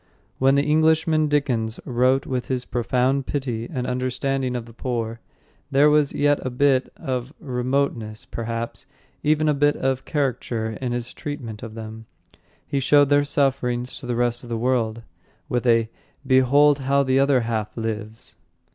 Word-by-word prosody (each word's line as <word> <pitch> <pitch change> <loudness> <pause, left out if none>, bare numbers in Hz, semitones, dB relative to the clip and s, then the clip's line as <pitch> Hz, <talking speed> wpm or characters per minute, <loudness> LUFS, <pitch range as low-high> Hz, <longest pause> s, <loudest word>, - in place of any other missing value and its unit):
When 135 +1 +4
the 140 - +3
Englishman 155 +1 +3
Dickens 125 -7 0
wrote 130 +2 +2
with 125 -2 -3
his 125 -1 -2
profound 130 +2 0
pity 120 -5 -3
and 125 -5 -3
understanding 130 +1 -1
of 120 -2 -4
the 115 - -14
poor, 115 -2 -3 0.5
there 145 +2 +5
was 150 -2 +3
yet 145 0 +1
a 130 - -2
bit; 130 +1 +2
of 130 +2 -4
remoteness, 125 -5 -2
perhaps, 115 0 -5 0.3
even, 155 +1 +2
a 150 - +4
bit 145 +1 +2
of 130 0 -1
caricature, 125 -6 -2
in 125 -2 -2
his 120 0 -4
treatment 125 -8 -6
of 115 -3 -8
them. 110 0 -8 0.6
He 140 - -1
showed 145 +1 +4
their 145 0 +4
sufferings 130 -4 0
to 130 - -9
the 120 - -1
rest 120 0 0
of 120 - -11
the 115 - -2
world 115 -2 0 0.4
with 125 +1 -1
a 115 -1 +4 0.4
"Behold 140 +3 +4
how 140 +1 +2
the 130 0 +2
other 135 -2 +3
half 110 -2 -3
lives!" 110 -1 -5
130 Hz, 160 wpm, -23 LUFS, 115-140 Hz, 0.6 s, there